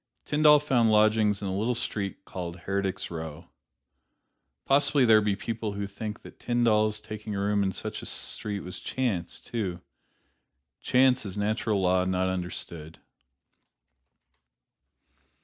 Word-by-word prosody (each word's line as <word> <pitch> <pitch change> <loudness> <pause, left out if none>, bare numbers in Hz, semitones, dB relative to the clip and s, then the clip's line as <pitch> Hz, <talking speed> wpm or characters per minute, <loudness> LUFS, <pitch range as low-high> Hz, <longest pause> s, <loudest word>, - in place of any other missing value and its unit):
Tyndall 150 0 +6
found 130 -6 +2
lodgings 105 -1 +3
in - - -2
a 95 - -2
little 115 +5 0
street 100 -4 -3
called 90 -1 -6
"Heretics' 95 -2 -2
Row." 80 -2 -6 1.2
Possibly 140 -1 +4
there 110 -2 +6
be 105 -1 +1
people 110 0 -4
who 100 0 -3
think 105 +2 -6
that - - -13
Tyndall's 110 -3 +2
taking 105 0 -6
a - - -2
room 100 +1 +1
in 95 -1 +1
such - - -6
a - - -8
street 100 -2 -4
was 90 0 -7
chance, 110 -10 -2
too. 95 -7 -4 1.0
Chance 130 0 +3
is 100 -1 -6
natural 105 0 0
law 90 0 +3
not 95 0 +1
understood. 85 -3 -5
105 Hz, 130 wpm, -27 LUFS, 95-115 Hz, 1.2 s, Tyndall